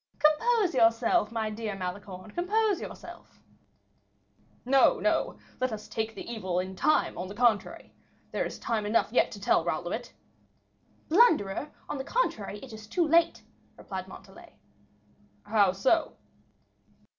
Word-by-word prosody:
"Compose 355 +6 +3
yourself, 230 -2 +3
my 220 -2 -2
dear 215 -1 -4
Malicorne, 185 +1 -7
compose 410 - +1
yourself." - - -10 1.3
"No, 270 +1 +4
no; - - 0 0.2
let 255 -1 0
us 215 -1 -6
take 220 0 -3
the - - -8
evil 190 -7 -3
in 185 +1 -4
time, 305 - +2
on 180 - -4
the 200 - -9
contrary. 230 -3 0 0.4
There - - -1
is - - -5
time 220 -3 -2
enough 220 +1 +1
yet - - +3
to 205 - -9
tell 200 - +2
Raoul 170 0 -2
of 175 - -3
it." 240 +2 -5 1.0
"Blunderer, 300 - +3 0.2
on 280 - -4
the - - -3
contrary, 235 - -1
it 260 -4 -10
is 215 -1 -10
too 335 +8 +1
late," 330 +2 +3 0.3
replied 190 -1 -6
Montalais. 190 - -14 0.9
"How 205 -3 +3
so?" 265 - +1
225 Hz, 145 wpm, -28 LUFS, 200-300 Hz, 1.3 s, No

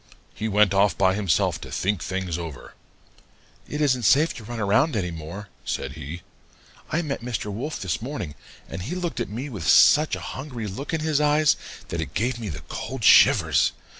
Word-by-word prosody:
He 110 - -3
went 105 -2 +3
off 100 -2 +3
by 95 -1 +3
himself 100 -4 +1
to - - -9
think 100 -2 -1
things 95 -3 -3
over. 80 -4 -7 1.0
'It 150 - -4
isn't 130 -4 +2
safe 145 +8 +4
to 115 - -10
run 120 +2 -6
around 110 +9 +2
any 90 -4 -1
more,' 85 +5 -8
said 65 - -3
he. 80 +3 -8 0.7
'I 165 +3 0
met 140 -5 -3
Mr. 115 -4 -4
Wolf 135 +9 -4
this 95 0 -2
morning, 115 - -5 0.3
and 85 - -6
he 135 - -4
looked 180 -2 -3
at - - -2
me 120 +7 -5
with 100 - -6
such 155 +1 +6
a - - -7
hungry 130 -5 -6
look 105 +9 -5
in 160 -1 -1
his 155 -2 +1
eyes 150 0 +4 0.3
that 85 - -2
it 75 -4 -6
gave 120 +2 0
me 110 -3 -5
the 80 -1 -6
cold - - -5
shivers. - - +6
105 Hz, 195 wpm, -24 LUFS, 90-140 Hz, 1.0 s, such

